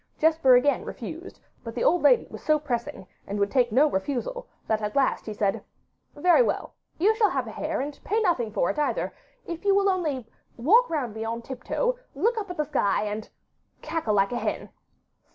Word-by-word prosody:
Jesper 315 -5 +5
again 255 +2 +3
refused, 330 - -8 0.2
but 230 -1 -7
the 245 - -1
old 355 +2 +3
lady - - +5
was - - -8
so 310 0 +3
pressing, 240 -9 -4 0.2
and 205 +1 -3
would 200 0 +1
take 245 -4 +2
no 265 +7 +5
refusal, 285 - -3 0.2
that 220 0 0
at 210 0 -3
last 275 -4 +1
he 215 - -3
said: 200 -2 0 0.5
'Very 350 +9 +5
well, 485 - -1 0.2
you 405 +7 +4
shall 435 -2 +3
have - - -1
a - - -7
hare, - - -3
and 285 +1 -6
pay 430 +3 0
nothing 330 - +1
for 195 -4 +1
it - - -5
either, 295 - -1 0.3
if 335 +1 -6
you 400 -1 +4
will 400 0 +3
only 305 - -1 0.3
walk 425 - +4
round 275 -9 -2
me 220 +1 -5
on 230 +1 -4
tiptoe, 485 - -2 0.2
look 470 +2 +1
up 410 - -5
to 360 - -6
the 300 - -1
sky, 210 -11 +1
and 210 +1 -4 0.5
cackle 310 -9 -1
like 195 0 +2
a 245 - -1
hen. - - -3
285 Hz, 205 wpm, -26 LUFS, 230-360 Hz, 0.5 s, Jesper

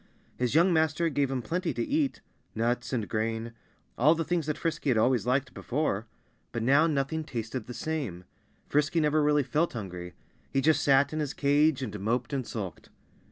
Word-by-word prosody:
His 125 +2 -1
young 175 +3 +5
master 160 +1 +2
gave 140 -2 0
him 130 -2 -2
plenty 175 - -2
to - - -1
eat 290 -2 0 0.3
nuts 120 +2 -1
and 115 -5 -1
grain 115 +1 -2 0.5
all 150 +7 +6
the 165 - -1
things 165 -1 -1
that 150 - -1
Frisky 165 -3 -2
had 120 - +3
always 120 0 +2
liked 130 +1 +1
before. 120 -6 -2 0.4
But 115 - -3
now 140 +6 +5
nothing 155 +1 -1
tasted 115 -3 -5
the 125 - -7
same. 135 - -3 0.4
Frisky 150 +3 +2
never 150 0 +2
felt 150 - +2
really 150 +2 +2
hungry. 90 -3 -7 0.4
He 135 - +1
just 155 +3 +3
sat 140 +1 +4
in 155 - -2
his 150 -2 -2
cage 145 0 +3
and 105 -4 -5
moped 120 +6 -1
and 130 -4 -2
sulked. 100 -6 -6
140 Hz, 185 wpm, -28 LUFS, 115-155 Hz, 0.5 s, all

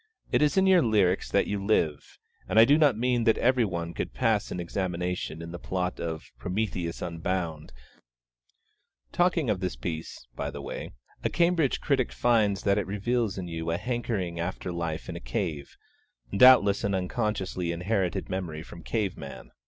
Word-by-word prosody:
It - - +3
is 150 +5 +3
in 190 - +5
your 190 -2 +6
lyrics 100 - +2
that 100 - +2
you 100 -1 -3
live, 80 -8 0 0.3
and - - 0
I 110 - +9
do 145 - +5
not 145 -7 +4
mean 120 0 +1
that 115 - +4
every 125 0 +3
one 85 -4 -3
could - - -4
pass 115 -5 +1
an 90 - -4
examination 90 -2 -3
in 85 - -7
the 85 - -7
plot 90 0 -2
of 80 -2 -5
"Prometheus 90 -3 -2
Unbound" 85 -3 -3 1.4
Talking 175 -5 +2
of 100 -4 +1
this 90 -5 -2
piece, 80 +2 -6
by - - -3
the - - -7
way, - - -6 0.3
a - - +1
Cambridge 170 -5 +2
critic 135 -4 +1
finds 105 -5 +2
that 100 0 +3
it 100 - -3
reveals 105 +2 -1
in 90 -2 -4
you 80 -1 -4
a 85 - 0
hankering 105 -7 -2
after 90 +1 -3
life 85 -2 -3
in - - -5
a - - -5
cave 70 +4 -4 0.6
doubtless 100 -3 +7
an 100 -1 +1
unconsciously 95 -2 -2
inherited 90 +1 -1
memory 85 -5 -4
from 85 - -11
cave 105 -3 -1
man. 70 - -9
95 Hz, 175 wpm, -28 LUFS, 85-115 Hz, 1.4 s, I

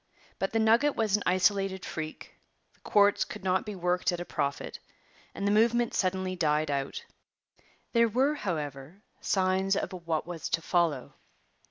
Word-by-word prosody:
But 195 - -1
the 225 - 0
nugget 230 +6 +4
was 215 -3 +2
an 210 - -1
isolated 190 +1 +1
freak; 155 -1 -6 0.4
the - - -30
quartz 205 -1 +3
could - - -9
not 190 +2 +1
be 210 - -4
worked 180 0 0
at 175 - -3
a 175 - -5
profit; 140 -3 -3 0.6
and 200 - -3
the 200 - +2
movement 235 +2 +3
suddenly 185 0 0
died 155 -3 +1
out. 140 -1 -3 0.9
There 235 -1 +5
were, 265 +7 +2
however, 155 - -5 0.2
signs 190 0 +1
of - - -2
what 170 -3 -2
was 170 -2 -5
to 165 - 0
follow. 165 -8 0
185 Hz, 160 wpm, -29 LUFS, 165-205 Hz, 0.9 s, There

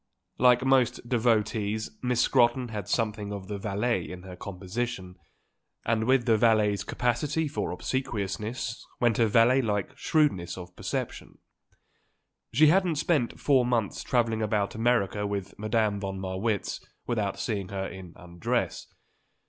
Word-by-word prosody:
Like 125 0 +5
most 130 -3 +2
devotees 110 -3 +1
Miss 125 -2 +1
Scrotton 120 0 +3
had 105 -4 -5
something 105 -3 -1
of 100 -2 -6
the 105 -1 -4
valet 105 +4 -1
in 90 0 -8
her 95 -1 -9
composition, 95 +1 -5 0.7
and 110 -1 +1
with 130 -1 +3
the 115 -3 +4
valet's 105 -2 +3
capacity 140 +6 0
for 145 - -3
obsequiousness 115 -2 -3 0.2
went 120 -2 +2
a 115 - +5
valet 120 +5 +5
like 105 +2 -2
shrewdness 95 - +1
of 90 -1 -9
perception. - - -5 1.1
She 145 +7 +5
hadn't 175 +1 +4
spent 150 -5 0
four 135 -3 +4
months 120 -4 0
travelling 115 -3 +1
about 105 -2 0
America 110 -3 +1
with 100 -1 -4
Madame 110 -1 +1
von 95 -1 -4
Marwitz 95 +2 -2 0.2
without 105 -5 -1
seeing 100 -4 -2
her 95 -1 -3
in 95 -3 -9
undress. 85 -1 -3
110 Hz, 135 wpm, -28 LUFS, 100-120 Hz, 1.1 s, Like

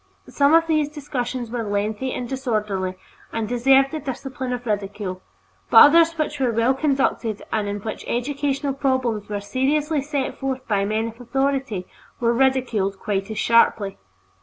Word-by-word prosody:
Some 285 +2 +4
of 330 0 +5
these 310 -3 +1
discussions 255 -5 -4
were 240 -1 -2
lengthy 210 +4 -2
and 245 - -4
disorderly 210 -8 -2 0.4
and 225 -1 -2
deserved 265 +3 +4
the 315 - -3
discipline 265 -2 -5
of 245 -1 -4
ridicule, 200 -3 -3 0.5
but - - +4
others 330 +3 +8
which 295 -2 -2
were 255 -3 +2
well 230 +3 +2
conducted 265 -6 0
and 215 -2 0
in 205 0 -4
which 220 +1 -5
educational 280 +2 -1
problems 260 -6 -1
were 205 -1 -2
seriously 285 +7 0
set 280 -1 -3
forth 265 -1 -3
by 200 -2 +1
men 220 +2 -1
of 230 +2 -13
authority 270 -6 -1 0.3
were 235 0 +2
ridiculed 240 -6 +1
quite 195 0 -2
as 220 - -5
sharply. 220 -3 +3
245 Hz, 160 wpm, -22 LUFS, 215-275 Hz, 0.5 s, others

